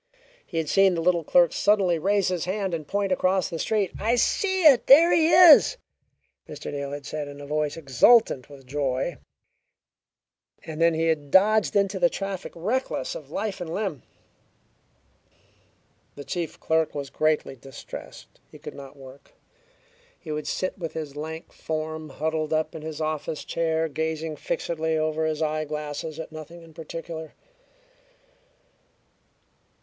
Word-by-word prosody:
He 170 Hz, -, -7 dB
had 160 Hz, -1 st, -1 dB
seen 195 Hz, +2 st, +4 dB
the 165 Hz, -, -1 dB
little 170 Hz, 0 st, +2 dB
clerk 175 Hz, +1 st, +4 dB
suddenly 195 Hz, -5 st, +2 dB
raise 200 Hz, +3 st, +1 dB
his 180 Hz, -3 st, -2 dB
hand 190 Hz, 0 st, -2 dB
and 155 Hz, -3 st, -4 dB
point 200 Hz, -1 st, -1 dB
across 185 Hz, 0 st, +1 dB
the 165 Hz, -, -4 dB
street. 205 Hz, -2 st, 0 dB
"I 230 Hz, +3 st, +1 dB
see 380 Hz, -, +1 dB
it! 285 Hz, -6 st, +6 dB
There 325 Hz, +6 st, +8 dB
he 320 Hz, -1 st, +4 dB
is!" 355 Hz, +7 st, +8 dB, 0.7 s
Mr. -, -, -7 dB
Neal 140 Hz, -1 st, -4 dB
had 145 Hz, -1 st, -7 dB
said 150 Hz, 0 st, -4 dB
in 145 Hz, 0 st, -10 dB
a 145 Hz, -, -8 dB
voice 150 Hz, +1 st, -2 dB
exultant 145 Hz, -, +4 dB
with 140 Hz, -2 st, -14 dB
joy, 135 Hz, +3 st, -2 dB, 1.5 s
and 160 Hz, 0 st, -6 dB
then 165 Hz, -1 st, +4 dB
he 165 Hz, +1 st, 0 dB
had 155 Hz, -3 st, 0 dB
dodged 210 Hz, +6 st, +4 dB
into 200 Hz, -1 st, +1 dB
the 175 Hz, -1 st, +4 dB
traffic, 195 Hz, 0 st, -5 dB
reckless 250 Hz, -, -2 dB
of -, -, -9 dB
life 205 Hz, -2 st, -4 dB
and 165 Hz, -2 st, -5 dB
limb. 185 Hz, -, -3 dB, 2.1 s
The 145 Hz, -, -8 dB
chief 165 Hz, +4 st, -4 dB
clerk 160 Hz, -1 st, 0 dB
was 140 Hz, -2 st, -5 dB
greatly 155 Hz, -2 st, 0 dB
distressed. 135 Hz, +1 st, -11 dB
He -, -, -13 dB
could -, -, -9 dB
not 140 Hz, +1 st, -11 dB
work. 135 Hz, +1 st, -14 dB, 0.8 s
He 155 Hz, -, -9 dB
would 150 Hz, 0 st, -4 dB
sit 185 Hz, +1 st, -3 dB
with 165 Hz, -3 st, -5 dB
his 150 Hz, -3 st, -6 dB
lank 160 Hz, +2 st, -7 dB
form 155 Hz, 0 st, -5 dB
huddled 155 Hz, +2 st, -2 dB
up 155 Hz, 0 st, 0 dB
in 160 Hz, -, -7 dB
his 160 Hz, 0 st, -6 dB
office 155 Hz, -1 st, -3 dB
chair, 160 Hz, -1 st, 0 dB
gazing 160 Hz, 0 st, -3 dB
fixedly 160 Hz, +2 st, -2 dB
over 155 Hz, 0 st, 0 dB
his 155 Hz, 0 st, -1 dB
eyeglasses 150 Hz, 0 st, -4 dB
at 160 Hz, -, -7 dB
nothing 165 Hz, +2 st, -10 dB
in 165 Hz, -1 st, -16 dB
particular. 160 Hz, 0 st, -8 dB
160 Hz, 155 wpm, -25 LUFS, 150-190 Hz, 2.1 s, There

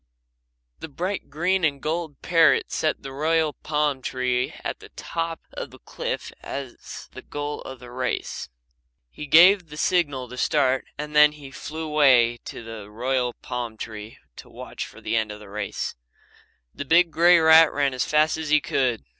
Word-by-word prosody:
The 160 Hz, -, -7 dB
bright 185 Hz, +7 st, -4 dB
green 180 Hz, +6 st, 0 dB
and 145 Hz, -3 st, +1 dB
gold 160 Hz, -1 st, -4 dB
parrot 165 Hz, -2 st, +4 dB
set 155 Hz, -, -1 dB
the 135 Hz, -, -7 dB
royal 155 Hz, +2 st, +1 dB
palm 150 Hz, -3 st, -1 dB
tree 125 Hz, -1 st, -1 dB
at -, -, -4 dB
the -, -, -13 dB
top 165 Hz, 0 st, -4 dB
of -, -, -6 dB
the -, -, -14 dB
cliff -, -, -5 dB
as 135 Hz, -3 st, -8 dB
the -, -, -10 dB
goal 145 Hz, 0 st, -5 dB
of 130 Hz, -1 st, -9 dB
the 125 Hz, 0 st, -12 dB
race. 125 Hz, 0 st, -3 dB, 0.6 s
He 150 Hz, -, -8 dB
gave 175 Hz, +3 st, +6 dB
the 150 Hz, -, -10 dB
signal 145 Hz, -8 st, 0 dB
to 125 Hz, -, -9 dB
start 130 Hz, -1 st, +1 dB
and 150 Hz, +1 st, -6 dB
then 150 Hz, 0 st, +7 dB
he 145 Hz, -3 st, -12 dB
flew 160 Hz, +4 st, -6 dB
away 130 Hz, -6 st, +4 dB
to -, -, -8 dB
the 110 Hz, -3 st, -9 dB
royal 125 Hz, +2 st, -1 dB
palm 120 Hz, -3 st, -5 dB
tree 110 Hz, -1 st, -8 dB, 0.2 s
to -, -, -12 dB
watch -, -, -7 dB
for -, -, -15 dB
the -, -, -2 dB
end 110 Hz, -2 st, 0 dB
of 105 Hz, -, -9 dB
the 105 Hz, -2 st, -13 dB
race. 100 Hz, -1 st, -4 dB, 0.8 s
The -, -, -5 dB
big 165 Hz, +4 st, +4 dB
grey 175 Hz, +2 st, +6 dB
rat 160 Hz, -1 st, +7 dB
ran 140 Hz, -2 st, 0 dB
as 130 Hz, -, 0 dB
fast 155 Hz, +1 st, +2 dB
as 160 Hz, -2 st, -4 dB
he 155 Hz, 0 st, +5 dB
could. 125 Hz, -5 st, -1 dB
145 Hz, 180 wpm, -24 LUFS, 125-160 Hz, 0.8 s, then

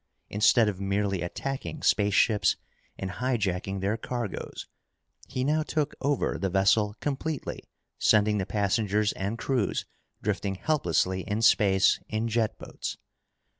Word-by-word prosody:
Instead 110 Hz, +2 st, +4 dB
of 100 Hz, -2 st, -2 dB
merely 100 Hz, -1 st, 0 dB
attacking 135 Hz, -, -4 dB
spaceships 105 Hz, +1 st, +3 dB, 0.4 s
and 95 Hz, -1 st, -4 dB
hijacking 100 Hz, -4 st, -1 dB
their 100 Hz, +3 st, 0 dB
cargoes, 120 Hz, -2 st, -5 dB, 0.6 s
he 130 Hz, -, -2 dB
now 150 Hz, +3 st, +2 dB
took 150 Hz, -1 st, -1 dB
over 140 Hz, 0 st, 0 dB
the 95 Hz, -, 0 dB
vessel 100 Hz, +2 st, +3 dB
completely, 145 Hz, +1 st, -3 dB, 0.4 s
sending 105 Hz, 0 st, +4 dB
the 95 Hz, -, -2 dB
passengers 105 Hz, 0 st, +1 dB
and 100 Hz, +4 st, -3 dB
crews 125 Hz, -4 st, -1 dB, 0.4 s
drifting 100 Hz, -1 st, -1 dB
helplessly 95 Hz, -, +1 dB
in 105 Hz, +1 st, 0 dB
space 100 Hz, -3 st, +4 dB
in 110 Hz, +1 st, -1 dB
jet 115 Hz, -1 st, 0 dB
boats. -, -, -6 dB
105 Hz, 125 wpm, -27 LUFS, 95-120 Hz, 0.6 s, Instead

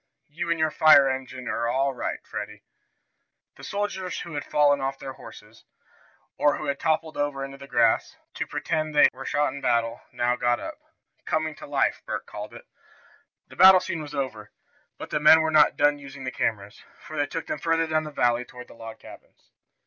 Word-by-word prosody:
"You 165 Hz, +3 st, -5 dB
and 170 Hz, -, +1 dB
your 160 Hz, -1 st, +2 dB
fire 150 Hz, -3 st, +6 dB
engine 130 Hz, -1 st, -5 dB
are 115 Hz, -, -1 dB
all 135 Hz, +3 st, 0 dB
right, 125 Hz, -, -3 dB
Freddie." -, -, -7 dB, 0.9 s
The -, -, -15 dB
soldiers 200 Hz, -3 st, -3 dB
who 170 Hz, -, -8 dB
had 145 Hz, -, -3 dB
fallen 145 Hz, -1 st, +2 dB
off 135 Hz, 0 st, -2 dB
their 135 Hz, 0 st, -7 dB
horses, 110 Hz, -3 st, -14 dB, 0.8 s
or 145 Hz, -, +3 dB
who 150 Hz, -, -6 dB
had 140 Hz, -1 st, -2 dB
toppled 160 Hz, 0 st, -1 dB
over 145 Hz, -2 st, -2 dB
in 135 Hz, -, -9 dB
the 140 Hz, 0 st, -11 dB
grass, 115 Hz, -3 st, +2 dB, 0.2 s
to -, -, -4 dB
pretend 155 Hz, -2 st, -2 dB
that 150 Hz, -, +7 dB
they -, -, -32 dB
were 135 Hz, +1 st, -8 dB
shot 145 Hz, -2 st, 0 dB
in 140 Hz, -, -8 dB
battle, 115 Hz, 0 st, 0 dB
now 120 Hz, 0 st, 0 dB
got 120 Hz, 0 st, +1 dB
up -, -, -8 dB, 0.5 s
"coming 155 Hz, 0 st, -1 dB
to 300 Hz, -, -11 dB
life," -, -, 0 dB
Bert -, -, -4 dB
called -, -, -8 dB
it. -, -, -12 dB, 0.8 s
The -, -, -15 dB
battle 190 Hz, 0 st, +8 dB
scene 170 Hz, -3 st, -4 dB
was 150 Hz, -1 st, -8 dB
over, 120 Hz, -7 st, -4 dB, 0.5 s
but -, -, -9 dB
the -, -, 0 dB
men 155 Hz, +2 st, +7 dB
were 160 Hz, 0 st, 0 dB
not 155 Hz, -1 st, +5 dB
yet -, -, -33 dB
done 145 Hz, 0 st, +3 dB
using 140 Hz, -1 st, -10 dB
the 130 Hz, -, -3 dB
cameras, 105 Hz, -3 st, -3 dB, 0.2 s
for 155 Hz, -, -11 dB
they 145 Hz, -1 st, 0 dB
took 165 Hz, +2 st, -5 dB
them -, -, -4 dB
farther 165 Hz, 0 st, +1 dB
down 155 Hz, -1 st, 0 dB
the 155 Hz, -, -6 dB
valley 120 Hz, -4 st, +1 dB
toward 125 Hz, 0 st, -12 dB
the -, -, -13 dB
log 115 Hz, -1 st, -10 dB
cabins. -, -, -16 dB
145 Hz, 210 wpm, -25 LUFS, 125-155 Hz, 0.9 s, battle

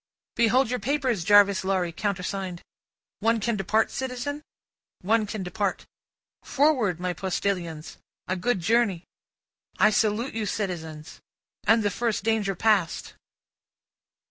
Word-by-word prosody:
"Behold 235 Hz, +2 st, +3 dB
your 250 Hz, -, -1 dB
papers, 255 Hz, -, 0 dB
Jarvis 200 Hz, 0 st, +5 dB
Lorry, 190 Hz, -2 st, 0 dB
countersigned." 190 Hz, 0 st, -3 dB, 0.6 s
"One 225 Hz, +2 st, +2 dB
can 230 Hz, +2 st, 0 dB
depart, 210 Hz, +3 st, +1 dB
citizen?" 265 Hz, +3 st, -4 dB, 0.6 s
"One 215 Hz, +3 st, +2 dB
can 205 Hz, -1 st, -4 dB
depart. 190 Hz, +2 st, -2 dB, 0.6 s
Forward, 260 Hz, -, +1 dB
my 180 Hz, 0 st, -2 dB
postilions! 175 Hz, -3 st, -3 dB, 0.3 s
A 185 Hz, -, 0 dB
good 190 Hz, +2 st, 0 dB
journey!" 215 Hz, -3 st, +2 dB, 0.7 s
"I -, -, +5 dB
salute 215 Hz, +4 st, +1 dB
you, 220 Hz, -1 st, -2 dB
citizens. 160 Hz, -7 st, -5 dB, 0.5 s
And 225 Hz, +1 st, +5 dB
the 205 Hz, -, +1 dB
first 230 Hz, 0 st, -1 dB
danger 215 Hz, -3 st, 0 dB
passed!" 200 Hz, -3 st, +1 dB
205 Hz, 115 wpm, -26 LUFS, 185-230 Hz, 0.7 s, Jarvis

